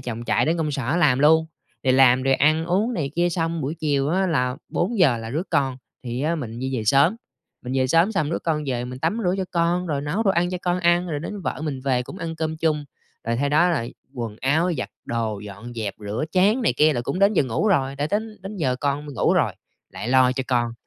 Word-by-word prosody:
chồng 120 Hz, -1 st, -5 dB
chạy -, -, +1 dB
đến 165 Hz, +2 st, +1 dB
công 155 Hz, -2 st, -1 dB
sở 140 Hz, +3 st, -1 dB
làm 145 Hz, -7 st, +3 dB
luôn, 160 Hz, +2 st, +5 dB, 0.4 s
rồi 130 Hz, -, +3 dB
làm, 130 Hz, -1 st, +5 dB
rồi 135 Hz, 0 st, +3 dB
ăn 155 Hz, +4 st, +2 dB
uống 205 Hz, +7 st, +1 dB
này 140 Hz, -5 st, -2 dB
kia 175 Hz, 0 st, +3 dB
xong 165 Hz, -1 st, -1 dB
buổi 145 Hz, +4 st, -3 dB
chiều 145 Hz, -3 st, 0 dB
á 190 Hz, +3 st, +1 dB
là 125 Hz, -6 st, 0 dB
4:00 205 Hz, +5 st, -1 dB
giờ 135 Hz, -10 st, +5 dB
là 115 Hz, 0 st, -6 dB
rước 160 Hz, +8 st, -3 dB
con 135 Hz, -2 st, +1 dB, 0.3 s
thì 120 Hz, +1 st, -3 dB
á 160 Hz, +3 st, +1 dB
mình 120 Hz, -7 st, -5 dB
di 130 Hz, 0 st, -2 dB
về 110 Hz, -, -3 dB
sớm. 140 Hz, -, +4 dB, 0.5 s
Mình 125 Hz, -, -5 dB
về 130 Hz, 0 st, +2 dB
sớm 165 Hz, +9 st, +3 dB
xong 155 Hz, -6 st, 0 dB
đứa -, -, -1 dB
con 155 Hz, -2 st, -1 dB
về 125 Hz, -2 st, -2 dB
mình 125 Hz, +1 st, -7 dB
tắm 165 Hz, -, -1 dB
rửa 180 Hz, +1 st, +2 dB
cho 190 Hz, -, 0 dB
con, 175 Hz, +1 st, +1 dB
rồi 145 Hz, -4 st, -1 dB
nấu 150 Hz, +10 st, -1 dB
đồ 200 Hz, -, +3 dB
ăn 175 Hz, 0 st, +1 dB
cho 180 Hz, -, -3 dB
con 180 Hz, 0 st, 0 dB
ăn, 175 Hz, +1 st, +3 dB
rồi 145 Hz, -2 st, -3 dB
đến 205 Hz, +4 st, -6 dB
vợ -, -, -3 dB
mình 140 Hz, -4 st, -3 dB
về 130 Hz, -2 st, 0 dB
cũng 190 Hz, -, -10 dB
ăn 165 Hz, -1 st, -5 dB
cơm 160 Hz, 0 st, -2 dB
chung, 155 Hz, -2 st, 0 dB, 0.4 s
rồi 115 Hz, +1 st, -1 dB
sau 140 Hz, -, +1 dB
đó 155 Hz, +5 st, +4 dB
là 140 Hz, -9 st, 0 dB, 0.3 s
quần 115 Hz, -4 st, -5 dB
áo, 160 Hz, +7 st, +2 dB
giặt -, -, -4 dB
đồ, 115 Hz, -3 st, -2 dB
dọn 105 Hz, +3 st, -9 dB
dẹp, 110 Hz, -3 st, -3 dB
rửa 105 Hz, +7 st, -3 dB
chén 205 Hz, +7 st, +3 dB
này -, -, +2 dB
kia 155 Hz, +1 st, +4 dB
là 120 Hz, -, -1 dB
cũng 180 Hz, -, -3 dB
đến 200 Hz, +2 st, +4 dB
giờ 185 Hz, -, +3 dB
ngủ 130 Hz, -, 0 dB
rồi, 135 Hz, -7 st, +1 dB
đã 145 Hz, +1 st, -1 dB
đến 215 Hz, +1 st, -2 dB
đến 200 Hz, +2 st, -7 dB
giờ 130 Hz, -7 st, 0 dB
con 145 Hz, +2 st, -2 dB
mình 145 Hz, -, -8 dB
ngủ -, -, +2 dB
rồi, -, -, +2 dB, 0.4 s
lại 110 Hz, -, -5 dB
lo 130 Hz, -1 st, +4 dB
cho 130 Hz, 0 st, -3 dB
con, 120 Hz, -2 st, 0 dB
150 Hz, 260 wpm, -23 LUFS, 130-175 Hz, 0.5 s, luôn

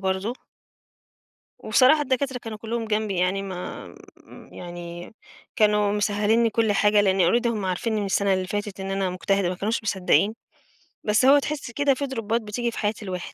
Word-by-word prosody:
برضه. 190 Hz, +4 st, -1 dB, 1.3 s
وبصراحة 260 Hz, +7 st, +4 dB
الدكاترة 265 Hz, -1 st, -1 dB
كانوا 225 Hz, -2 st, -8 dB
كُلّهم 230 Hz, +1 st, -3 dB
جنبي 215 Hz, -3 st, -1 dB
يعني 185 Hz, +2 st, +1 dB
ما 185 Hz, -2 st, -6 dB, 0.4 s
م -, -, -15 dB
يعني 175 Hz, +2 st, -8 dB, 0.4 s
كانوا 210 Hz, -1 st, +3 dB
مسهِّلين 210 Hz, +2 st, +1 dB
لي 230 Hz, -, +2 dB
كل 220 Hz, -1 st, +1 dB
حاجة 210 Hz, +1 st, +4 dB
لإن 195 Hz, -1 st, +2 dB, 0.2 s
already 240 Hz, -, -2 dB
هم 220 Hz, -4 st, -1 dB
عارفينّي 210 Hz, +4 st, -1 dB
من 200 Hz, -, -2 dB
السَنة 195 Hz, 0 st, +1 dB
اللي 185 Hz, 0 st, -2 dB
فاتت 205 Hz, 0 st, -4 dB
إن 195 Hz, 0 st, -4 dB
أنا 195 Hz, -1 st, -1 dB
مجتهدة، 190 Hz, 0 st, 0 dB
ما 180 Hz, -, -2 dB
كانوش 215 Hz, +6 st, -2 dB
مصدّقين، 195 Hz, 0 st, +2 dB, 0.7 s
بس 215 Hz, +4 st, +2 dB
هو 280 Hz, +2 st, +7 dB
تحِس 285 Hz, -3 st, -4 dB
كده 285 Hz, +3 st, +2 dB
في 280 Hz, +2 st, -3 dB
درُوبّات 230 Hz, -3 st, -2 dB
بتيجي 235 Hz, +3 st, -3 dB
في -, -, -10 dB
حياة 210 Hz, 0 st, 0 dB
الواحد. 185 Hz, -2 st, -6 dB
210 Hz, 175 wpm, -24 LUFS, 195-230 Hz, 1.3 s, هو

